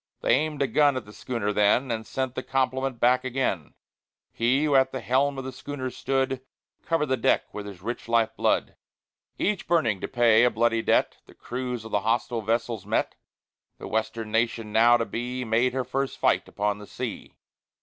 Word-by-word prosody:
They - - +3
aimed 150 0 +1
a - - +1
gun 145 -1 +3
at 125 - -5
the 105 - -13
schooner 110 -4 -3
then, 105 +5 +3
And 110 -1 -3
sent 130 -1 -2
the - - -3
compliment 130 -1 -1
back 125 +2 +3
again; 125 - -2 0.6
He 125 +5 +1
who 150 -2 +1
at 130 0 +4
the 130 - -4
helm 135 +4 +1
of 135 - -4
the 130 - -5
schooner 130 -2 -5
stood, 135 0 -1 0.4
Covered 165 -2 0
the 130 -2 0
deck 115 - +1
with 105 -1 -6
his 95 -3 -10
rich 120 +1 -5
life 115 -1 +2
blood. - - 0 0.6
V - - +1
Each 210 - -8
burning 120 - +2
to - - -3
pay 120 -2 +4
a 125 - +5
bloody 115 0 +1
debt, - - +2
The - - -17
crews 125 -2 -5
of 110 - -9
the 105 - +2
hostile 115 +2 0
vessels 115 -1 -1
met; 105 +3 -1 0.6
The - - -8
Western 110 0 -2
nation 115 -1 0
now 120 +2 +6
to 115 - -1
be, 125 +2 -4
Made 115 +3 +2
her 130 0 -1
first 135 +2 -2
fight - - +2
upon 105 0 -2
the 105 - -11
sea. - - -6
120 Hz, 200 wpm, -26 LUFS, 110-130 Hz, 0.6 s, now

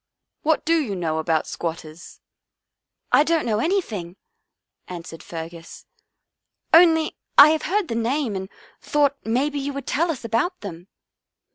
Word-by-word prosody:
What 315 0 +1
do 330 +1 +3
you 230 -10 -2
know 160 -3 -2
about 160 -1 0
squatters?" 165 -1 -7 0.4
" - - -55
I 290 - +6
don't 325 0 +1
know 215 -2 0
anything," 220 - -2 0.7
answered 170 -2 -8
Fergus. 165 0 -9 0.4
" - - -52
Only 325 -1 +5 0.2
I 290 - +10
have 315 0 +1
heard 405 -1 +1
the - - -3
name 230 0 -1
and 190 0 -5 0.3
thought 285 -1 +1
maybe 275 +6 0
you 280 +1 -3
would 280 0 -6
tell 335 +4 0
us 275 -7 -4
about 235 - -1
them." 180 -3 -8
235 Hz, 150 wpm, -23 LUFS, -, 0.7 s, I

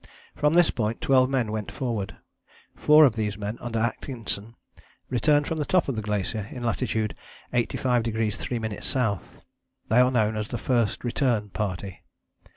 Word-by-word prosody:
From 150 +2 +2
this 175 -1 +5
point 110 -1 -2
twelve 130 -1 +4
men 125 -5 0
went 110 -2 -4
forward. 115 -8 -3 0.6
Four 150 0 +7
of 125 -5 +2
these 105 -2 -2
men 105 +2 -4
under 115 -1 -3
Atkinson 115 -2 -3 0.6
returned 145 +4 +3
from 160 +1 -2
the - - +1
top 185 +4 +2
of 135 - -1
the 110 - -2
glacier 105 0 -2
in 125 - -7
latitude 110 -2 -1 0.4
85° 120 0 +1
3´ 110 0 -2 0.3
S.: 100 -3 -5 0.5
they 115 - +5
are 125 0 +6
known 110 -4 +1
as 105 -1 -2
the - - -4
First 120 -5 0
Return 120 -4 0
Party. 95 -2 -4
115 Hz, 160 wpm, -26 LUFS, 105-130 Hz, 0.6 s, Four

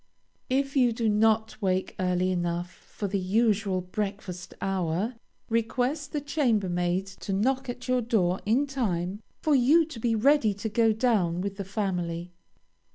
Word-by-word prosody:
If 275 +2 0
you 250 -3 +4
do 225 0 -1
not 220 +1 +2
wake 185 -1 0
early 180 0 +1
enough 175 0 -2
for 205 - -7
the 195 +1 -1
usual 200 -1 +1
breakfast 190 -1 -5
hour, 190 +3 -1 0.3
request 250 +6 -1
the 295 - -2
chambermaid 195 - 0 0.2
to - - -4
knock 260 +7 0
at 245 +1 -6
your 255 0 +2
door 190 -6 +1
in 240 +7 +2
time 205 -8 -2 0.2
for 305 - +3
you 285 +6 +5
to 300 -7 -9
be 230 0 +1
ready 230 -2 +3
to 205 +3 -4
go 225 +1 +3
down 210 -7 +1
with 200 +1 -3
the 200 - -3
family. 180 -4 -3
210 Hz, 155 wpm, -27 LUFS, 185-245 Hz, 0.3 s, you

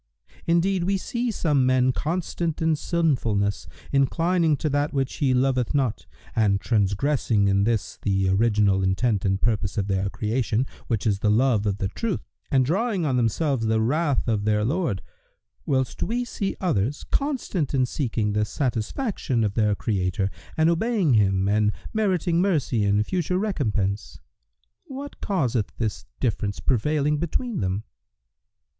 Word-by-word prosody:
Indeed, 170 +2 +2
we 195 +1 +1
see 240 +5 -2
some 150 - +1
men 130 0 +3
constant 165 +2 -2
in 160 -1 +2
sinfulness, 125 - 0 0.2
inclining 165 +3 +2
to 155 - -1
that 145 +1 0
which 135 -2 -1
He 140 -3 +2
loveth 130 0 +1
not 130 -6 0 0.3
and 100 -3 +3
transgressing 105 +1 +1
in 100 0 +3
this 115 -2 -1
the 95 -1 +1
original 100 -1 +3
intent 95 +3 +1
and 95 0 +1
purpose 110 -2 0
of 100 - +1
their 95 -1 0
creation, 115 +3 -1 0.2
which 115 -4 -1
is 100 -3 +1
the 105 - +1
love 110 -1 +3
of 100 -1 0
the 95 - -1
Truth, 225 - -2 0.3
and 130 -2 +3
drawing 195 - 0
on 135 -4 +1
themselves 125 +1 +1
the 110 0 +2
wrath 140 +5 +1
of 110 -3 0
their 105 0 +1
Lord, 150 - -1 0.6
whilst 130 -2 0
we 245 +2 -1
see 200 -4 -3
others 145 - 0
constant 225 - -1
in 130 -1 +3
seeking 115 -6 -1
the 105 0 +1
satisfaction 125 - -1
of 105 -2 0
their 105 -2 +2
Creator 95 -2 -1 0.3
and 160 0 +4
obeying 180 - +2
Him 95 -3 +3
and 105 +1 +2 0.2
meriting 180 -5 +1
mercy 145 - +1
and 105 +1 +2
future 180 +3 -1
recompense. 110 - -1 0.7
What 280 +2 -8
causeth 130 - 0
this 110 -3 -3
difference 105 -4 -1
prevailing 150 +4 +1
between 215 - -2
them?" 95 +1 -1
125 Hz, 150 wpm, -24 LUFS, 105-165 Hz, 0.7 s, and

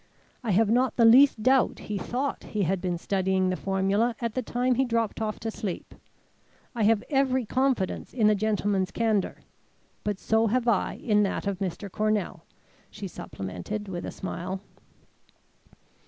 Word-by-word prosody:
I 235 - -3
have 210 +2 +3
not 250 0 +2
the 230 - +5
least 240 -1 +6
doubt 260 +1 +3
he 210 -1 -4
thought 260 +8 -3
he 205 - +2
had 185 +1 0
been 180 -2 -1
studying 190 +1 0
the - - 0
formula 195 +5 0
at 235 -2 -2
the 255 - -1
time 250 +2 0
he 260 +2 +2
dropped 230 -4 -1
off 215 -1 -2
to 225 0 -3
sleep. 205 -4 -5 0.8
I 235 - -3
have 220 -1 +3
every 260 -3 +2
confidence 255 -4 0
in 230 -4 +1
the 215 - +6
gentleman's 205 -2 0
candour. 220 -4 0 0.6
But 205 -2 -1
so 220 +3 +2
have 245 +2 0
I 225 -5 +1
in 210 -2 +2
that 200 0 -1
of 200 -2 -2
Mr. 190 +1 -3
Cornell," 210 -5 -1 0.5
she 205 -2 -7
supplemented, 95 - -6
with 175 -2 -5
a - - -4
smile. 185 +1 -5
215 Hz, 165 wpm, -27 LUFS, 190-235 Hz, 0.8 s, least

